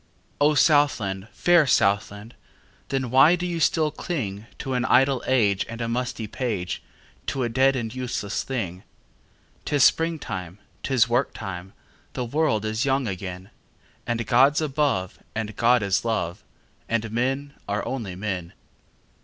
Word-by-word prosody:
O 150 +1 +4
Southland, 115 - +2
fair 175 - +4
Southland! 105 0 +1 0.6
Then 135 -3 -2
why 135 +7 +7
do 180 0 -4
you 175 -2 -2
still 155 0 +2
clingTo 125 - -4
an 125 - +1
idle 135 0 +3
age 105 -7 +3
and 115 +1 -7
a 115 - -2
musty 120 -1 -2
page, 105 -5 -3 0.5
To 135 -2 -1
a 120 - 0
dead 130 +3 +3
and 115 -3 -3
useless 125 -5 -3
thing?'Tis 115 +5 -5
springtime! 120 - +1 0.2
'Tis 130 -4 +2
work 120 +3 0
time! 95 -2 -7 0.4
The 125 - -3
world 120 -5 0
is 110 +3 -1
young 135 -2 +1
again! 95 -1 -6 0.6
And 115 -1 -1
God's 130 +7 +4
above, 140 - -1 0.2
and 110 -1 -3
God 120 -1 +3
is 100 -1 +1
love, 100 -6 -2 0.5
And 115 -1 -1
men 135 +5 -1 0.2
are 100 0 -1
only 110 -9 -4
men. 90 -3 -4
120 Hz, 135 wpm, -24 LUFS, 100-135 Hz, 0.6 s, why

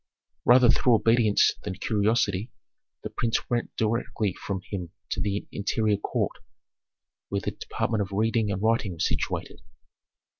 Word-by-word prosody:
Rather 125 0 +7
through 120 0 +4
obedience 115 -1 +4
than 95 -2 -5
curiosity, 105 +1 +1 0.5
the - - -4
prince 115 -1 -1
went 120 -1 0
directly 110 -3 -1
from 95 0 -4
him 90 -4 -4 0.2
to - - -1
the 100 0 -1
interior 105 +1 0
court, - - -2 0.9
where 100 0 -1
the - - -2
department 110 -1 -2
of 100 0 -3
reading 110 +1 +1
and 95 +1 -3
writing 110 -4 +1
was 80 - 0
situated. - - -3
105 Hz, 140 wpm, -26 LUFS, 100-115 Hz, 0.9 s, Rather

